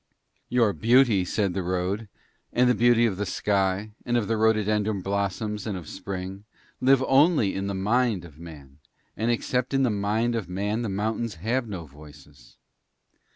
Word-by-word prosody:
'Your 115 -4 +3
beauty,' 115 -4 +4
said 95 +1 -1
the 95 - -2
road, 95 +4 -2 0.4
'and 125 +1 +3
the 125 - +4
beauty 120 0 +4
of 100 -5 -1
the 105 - -2
sky, 100 +2 0
and 120 0 0
of 110 -4 -1
the 115 - +1
rhododendron 110 -2 +1
blossom 100 +2 -2
and 100 -3 -3
of 85 -4 -9
spring, 95 +1 -6 0.4
live 130 0 +4
only 135 - +3
in 95 0 -3
the 100 - -3
mind 105 -1 +1
of 80 -2 -15
Man, 75 -4 -12 0.4
and 115 +2 -1
except 125 +2 -1
in 135 - +3
the 125 - +2
mind 105 +4 0
of 110 -6 -3
Man 105 +5 -2
the 115 - -2
mountains 110 +2 -2
have 115 +8 -1
no 90 -5 -6
voices. 75 -3 -16
105 Hz, 170 wpm, -25 LUFS, 95-115 Hz, 0.4 s, beauty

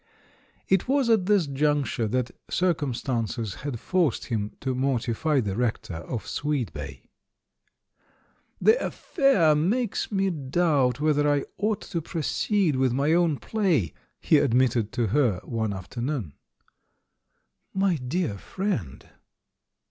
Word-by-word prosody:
It 190 +3 +2
was 265 -3 +2
at 200 -5 +3
this 205 -5 +4
juncture 140 -4 0
that 125 +2 -1 0.2
circumstances 125 - -1
had 135 -4 -4
forced 175 -4 0
him 105 -4 -2
to 130 -1 -1
mortify 130 +2 0
the 100 -4 -3
rector 110 -7 -2
of 110 +7 -5
Sweetbay. 145 -5 -3 1.6
"The 460 +3 +4
affair 200 - +2
makes 200 +12 0
me 195 -1 +1
doubt 140 -4 +1
whether 150 -1 +2
I 145 -1 +1
ought 210 -1 0
to 170 - -4
proceed 165 +1 0
with 130 -2 +2
my 140 +5 +2
own 170 -4 +3
play," 180 - 0 0.3
he 155 - +4
admitted 120 -4 +2
to 120 -3 +1
her 120 -7 +2
one 110 -3 -2
afternoon. 115 - -4 1.4
"My 190 -3 +1
dear 130 - -2
friend!" 185 - -4
145 Hz, 120 wpm, -26 LUFS, 120-175 Hz, 1.6 s, this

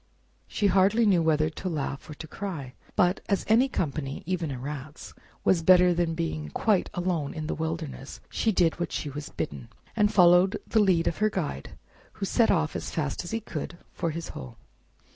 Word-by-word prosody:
She 210 - -2
hardly 200 +4 +4
knew 190 -5 +4
whether 155 -1 +2
to 185 +3 -5
laugh 140 -4 -4
or 150 - -7
to 160 - -9
cry, 155 -8 -6 0.2
but 180 +2 +3
as 200 - +1
any 240 +5 +4
company, 140 - -3
even 175 -2 -2
a 135 - -4
Rat's, 140 +3 -7 0.3
was 175 -3 +3
better 180 +1 +6
than 170 -1 0
being 80 - -3
quite 205 - +1
alone 175 -5 -1
in 155 -1 -4
the - - -2
wilderness, 160 -4 -5
she 225 - 0
did 175 -4 +2
what 175 - -2
she 145 - -3
was 145 +1 -6
bidden, 70 -4 -5 0.3
and 210 0 +3
followed 180 0 +5
the 220 - +2
lead 185 -5 +3
of 170 - 0
her 215 0 +2
guide, 155 - -4 0.4
who 210 - -4
set 225 +3 +3
off 160 -4 +1
as - - -4
fast 150 -1 -2
as 175 - -7
be 225 0 -2
could 170 -3 -6 0.2
for 170 - -2
his 165 +1 -5
hole. 65 -2 -9
170 Hz, 195 wpm, -27 LUFS, 150-190 Hz, 0.4 s, better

